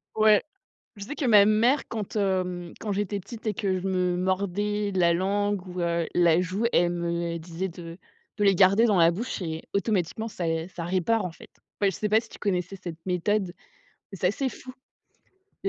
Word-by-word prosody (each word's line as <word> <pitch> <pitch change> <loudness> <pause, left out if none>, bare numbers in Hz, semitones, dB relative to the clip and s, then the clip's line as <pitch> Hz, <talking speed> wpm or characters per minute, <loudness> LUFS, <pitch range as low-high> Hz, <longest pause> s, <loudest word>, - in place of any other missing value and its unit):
Ouais. 215 -1 +5 0.5
Je 200 - -7
sais 290 - -6
que 300 - -4
ma 210 -4 +7
mère 235 +6 +3
quand, 215 -1 -5
hem, 180 -3 -1
quand 210 -2 -3
j'étais 205 0 -1
petite 220 +4 -10
et 210 - 0
que 190 -3 -1
je 190 - -4
me 180 -1 +1
mordais 200 +3 -1
la 170 -2 +3
langue 200 +1 0
ou 180 0 -6
heu, 170 -1 0
la 170 -1 +4
joue, 185 +5 -2
elle 175 0 +3
me 170 -1 -2
disait 170 +3 -4
de 170 0 -9 0.4
de 205 - +2
les 195 - +5
garder 195 +5 +5
dans 210 - +3
la 165 0 +6
bouche 210 +3 -4
et 160 -2 -4
automatiquement 200 +1 0
ça 175 -5 -3
et 165 0 -1
ça 170 -2 -7
répare, 190 +5 +1
en 170 - -7
fait. - - -15 0.3
Bah, 200 - +3
et - - +2
je 180 - -7
sais 210 - -1
pas 215 +1 +5
si 225 - -16
tu - - -12
connaissais 185 -1 -2
cette 170 -3 -6
méthode, 185 +1 0 0.6
mais 195 - -8
c'est 180 - -2
assez 260 +7 -1
fou. 255 0 -11 0.9
Il - - -1
190 Hz, 210 wpm, -26 LUFS, 175-210 Hz, 0.9 s, ma